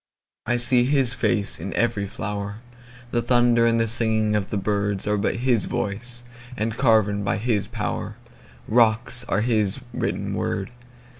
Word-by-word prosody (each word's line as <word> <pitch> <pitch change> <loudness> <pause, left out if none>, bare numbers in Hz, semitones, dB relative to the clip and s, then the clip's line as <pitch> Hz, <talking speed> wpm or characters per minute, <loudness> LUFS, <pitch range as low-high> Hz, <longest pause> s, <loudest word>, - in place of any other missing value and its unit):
I 120 +1 +1
see 120 0 +4
his 135 -3 +2
face 105 -7 0
in 95 +4 -5
every 115 -4 0
flower; 100 +1 -5 0.5
The 120 - +1
thunder 120 -1 +3
and 115 0 +2
the 115 - +1
singing 110 -2 +2
of 100 -2 -1
the 105 - -2
birdsAre 100 0 -1
but - - 0
his 120 -2 +1
voice—and 120 +1 -4
carven 110 -5 +2
by 100 - 0
his 110 -2 -1
powerRocks 115 +1 -1
are 105 - +1
his 110 -4 +1
written - - -2
words. 95 +4 -3
115 Hz, 140 wpm, -23 LUFS, 105-120 Hz, 0.5 s, see